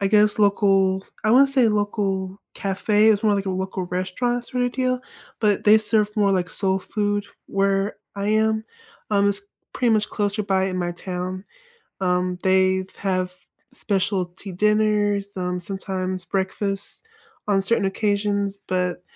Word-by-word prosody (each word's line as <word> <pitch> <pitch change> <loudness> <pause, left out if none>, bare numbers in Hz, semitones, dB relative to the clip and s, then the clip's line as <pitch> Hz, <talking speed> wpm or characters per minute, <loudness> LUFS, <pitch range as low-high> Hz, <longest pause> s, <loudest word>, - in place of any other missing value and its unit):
I 200 - +1
guess, 210 +1 +4
local 195 -2 +3 0.2
I 215 - +3
wanna 275 +2 +6
say 265 -3 +3
local 200 -2 -1
cafe. 210 +2 +2
It's 205 -1 +2
more 210 -1 +4
like 195 -1 -2
a - - 0
local 190 0 -3
restaurant 235 +7 -2
sorta 250 -1 0
deal, 255 0 -1 0.4
but 210 -2 +2
they 210 +1 +7
serve 215 -1 +1
more, 205 -2 +3
like, 180 -2 +1
soul 190 +2 0
food 205 0 -1 0.2
where 195 +1 0 0.2
I 200 0 -3
am. 220 +1 +2 0.5
Um, 200 -1 +3
it's 200 0 -1 0.3
pretty 245 -2 +1
much 215 -1 +2
closer 205 0 -1
by 190 -1 +1
in 185 -1 -3
my 175 -1 -1
town. 185 +1 -5 0.6
Um, 180 -1 0
they 190 0 +3
have 185 -2 -1 0.4
specialty 195 -4 -2
dinners, 210 0 +2
um, 180 -1 -2
sometimes 185 0 -4
breakfast 195 - -3 0.4
on 195 -1 +3
certain 200 +1 +1
occasions, 200 0 0
but 180 -1 -1
200 Hz, 145 wpm, -23 LUFS, 190-210 Hz, 0.6 s, they